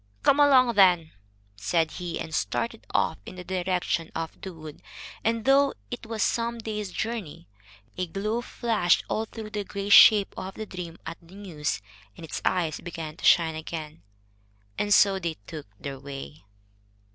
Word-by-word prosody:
"Come 280 - +4
along, 260 -4 +6
then," 180 -6 +5 0.4
said 155 - 0
he, 175 -1 -5
and 160 - -6
started 230 +5 -2
off 160 - +1
in - - -10
the 180 - -8
direction 180 -2 -1
of 165 0 -5
the 190 - -6
wood, 155 -3 -11 0.4
and, 225 0 0
though 275 +1 +4 0.2
it 240 -2 -6
was 225 -1 -1
some 235 0 0
days' 210 -3 -4
journey, 215 - -4 0.5
a 180 - -1
glow 210 +7 -2
flushed 225 -7 +1
all 220 - 0
through 220 -1 -9
the 210 -1 -2
gray 200 0 -5
shape 205 0 +8
of 190 0 -6
the 220 - -5
dream 175 -4 -7
at 165 +1 -6
the 170 +3 -16
news, 155 - -4 0.3
and 165 - -8
its 160 - -5
eyes 165 -5 0
began 165 -3 -6
to - - -6
shine 165 -2 +5
again. 155 0 -7 0.7
And 205 - -2
so 200 -1 +5
they 170 -3 -3
took 150 -1 -8
their 140 -2 -6
way. 130 - -9
185 Hz, 170 wpm, -26 LUFS, 160-215 Hz, 0.7 s, shape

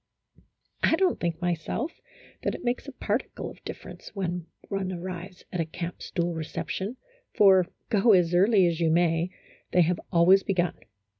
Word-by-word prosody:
I - - +4
don't 370 +1 +2
think 170 -1 -2
myself 175 - -2 0.4
that - - -1
it - - -9
makes 245 +3 -1
a - - -5
particle 225 -2 -3
of - - -17
difference - - -9
when 180 -3 -3 0.2
one 195 -2 -2
arrives 180 +1 -7
at 180 - -2
a - - -1
camp 170 +2 -6
stool 175 -1 -2
recep 160 -1 -5
tion, 205 +7 -3 0.4
for, 190 -3 +6 0.2
go 220 0 +4
as 175 -2 +4
early 195 +2 +5
as 170 -1 0
you 165 -1 +3
may, 165 +1 +2 0.4
they 180 - +6
have 170 +1 +2
always 180 +2 +6
begun. 180 -4 0
180 Hz, 165 wpm, -27 LUFS, 170-195 Hz, 0.4 s, for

